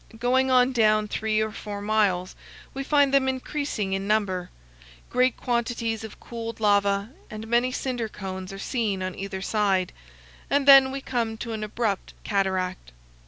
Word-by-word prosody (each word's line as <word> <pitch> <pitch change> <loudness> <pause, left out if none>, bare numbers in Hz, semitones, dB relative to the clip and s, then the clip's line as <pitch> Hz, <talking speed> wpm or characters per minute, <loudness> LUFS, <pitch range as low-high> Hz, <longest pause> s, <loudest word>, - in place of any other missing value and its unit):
Going 255 +3 +2
on 255 0 +4
down 215 -3 +3
three 215 +1 0
or 220 0 -1
four 205 -1 -6
miles, 200 -4 +1 0.4
we 275 - -4
find 285 -1 +3
them 270 -1 +4
increasing 260 -6 -3
in 195 +1 -2
number. 195 -4 0 0.6
Great 255 +1 +2
quantities 235 -2 -1
of 220 - -9
cooled 230 -1 -7
lava 200 0 +2 0.2
and 215 +1 -7
many 240 +2 +2
cinder 245 -3 -3
cones 190 -2 -6
are 195 - -7
seen 205 -3 -2
on 185 0 -3
either 195 0 -5
side; 195 -4 +1 0.6
and 285 0 +1
then 270 -1 +9
we 270 +1 -5
come 230 -4 -2
to 230 0 -5
an 215 -1 -4
abrupt 210 -2 -2
cataract. 185 - -1
220 Hz, 160 wpm, -25 LUFS, 200-250 Hz, 0.6 s, then